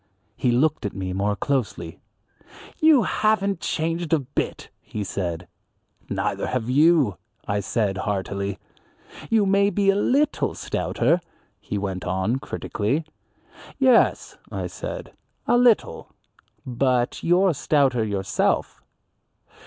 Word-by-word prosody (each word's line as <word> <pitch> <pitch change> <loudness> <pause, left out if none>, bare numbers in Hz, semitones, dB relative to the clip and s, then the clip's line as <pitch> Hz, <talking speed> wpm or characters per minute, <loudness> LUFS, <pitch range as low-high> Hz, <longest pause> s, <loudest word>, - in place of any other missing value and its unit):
He 125 - 0
looked 140 +5 +2
at 100 - -4
me 95 -1 -3
more 100 +2 0
closely. 100 - -2 0.8
"You 310 -6 +6
haven't 200 -3 +1
changed 165 0 -2
a - - +6
bit," 140 -1 -4
he 105 - -5
said. 90 -3 -4 0.6
"Neither - - -2
have 120 -3 -2
you," 145 - +4 0.4
said 100 -1 -1
I - - -1
heartily. 100 0 -2 0.7
"You 220 -3 +3
may 200 +1 +3
be 200 -1 +3
a - - -1
little 280 +8 +1
stouter," 175 +1 0 0.4
he 105 - -4
went 95 -2 -3
on 95 +8 -1
critically. 135 +5 -2 0.7
"Yes," 260 -3 +3
I - - -3
said, - - -7 0.3
"a 240 - +3
little; 245 -2 +2 0.6
but 125 -1 0
you're 180 +1 +3
stouter 135 -5 +2
yourself." 100 -2 -1
130 Hz, 115 wpm, -24 LUFS, -, 0.8 s, You